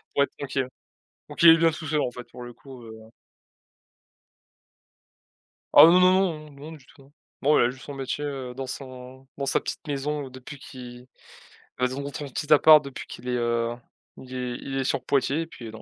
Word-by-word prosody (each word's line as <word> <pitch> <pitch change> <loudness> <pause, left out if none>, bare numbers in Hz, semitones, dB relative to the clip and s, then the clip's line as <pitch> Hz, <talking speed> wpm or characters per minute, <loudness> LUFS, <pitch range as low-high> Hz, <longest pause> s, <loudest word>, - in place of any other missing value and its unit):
pour 140 - +4
être - - -3
tranquille. 135 -2 -3 0.6
Donc - - -4
il 170 - +11
est 165 - +8
bien 165 0 +4
tout 160 - -8
seul 150 0 0
en 125 - -1
fait 125 0 -9
pour 125 - -11
le 120 0 -9
coup, 130 -1 -13
heu 110 0 -13 2.6
Ah, - - +10
heu, 165 - +9
non, 180 - +6
non, 180 -4 +2
non, - - -16
non 145 +3 -11
du 145 -4 -15
tout, 135 - -20
hein. 135 - -22 0.3
Bon 150 +2 +4
il - - +5
a - - +2
juste 130 +1 -10
son 145 - -7
métier, 135 +2 -4
heu, 135 -3 -5
dans 135 +1 -5
son 130 0 -9
dans 140 - -3
sa - - +1
petite - - -7
maison 145 0 -3
depuis 130 +2 -11
qui 125 -2 -11 0.7
et 125 - +2
zon 135 +2 -5
son 145 - -5
petit 150 +3 -5
appart 150 0 +7
depuis 140 -1 -8
qu'il 125 - -10
est, 125 - 0
heu, 120 0 -1 0.4
il 130 0 -12
est 125 -1 -4
il 135 0 -5
est - - 0
sur - - -1
Poitiers 140 +3 +1
et - - -11
puis 120 -8 -10
non. 110 0 -11
135 Hz, 215 wpm, -25 LUFS, 125-150 Hz, 2.6 s, il